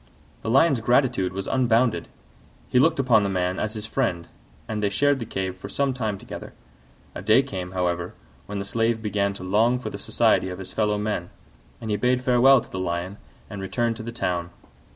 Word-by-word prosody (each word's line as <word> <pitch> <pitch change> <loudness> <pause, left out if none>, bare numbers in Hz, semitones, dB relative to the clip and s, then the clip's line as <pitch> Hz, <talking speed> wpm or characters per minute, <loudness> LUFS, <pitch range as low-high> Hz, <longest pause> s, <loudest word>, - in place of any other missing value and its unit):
The - - -4
Lion's 135 +2 +4
gratitude 120 -5 +2
was 95 +1 -4
unbounded; 125 -2 +2 0.6
he 125 - +3
looked 160 +4 +4
upon 125 -5 +4
the 100 - 0
man 90 -1 -1
as 110 0 -2
his 110 -1 -5
friend, 110 -8 -1 0.4
and 110 -1 -3
they 100 - +2
shared 140 +7 +2
the 115 - -5
cave 95 -1 -3
for 95 - -9
some 140 -1 0
time 110 -5 -2
together. - - -9 0.6
A - - -6
day - - +5
came, 90 -1 -6
however, 85 -1 -1 0.3
when 105 - -5
the 100 - -3
Slave 115 +2 0
began 100 -2 0
to 100 - -9
long 110 +6 +3
for 125 - -6
the - - -7
society 95 - +2
of 90 - -6
his 95 -1 -9
fellow 105 -1 +1
men, 105 -4 -2 0.5
and 110 -2 -5
he 105 - +1
bade 125 +4 +1
farewell 125 +1 +6
to - - -15
the 95 - -4
Lion 90 +2 -3 0.3
and 105 -2 -7
returned 115 +5 -1
to - - -7
the 115 +1 -6
town. 90 -6 -2
105 Hz, 205 wpm, -24 LUFS, 95-120 Hz, 0.6 s, farewell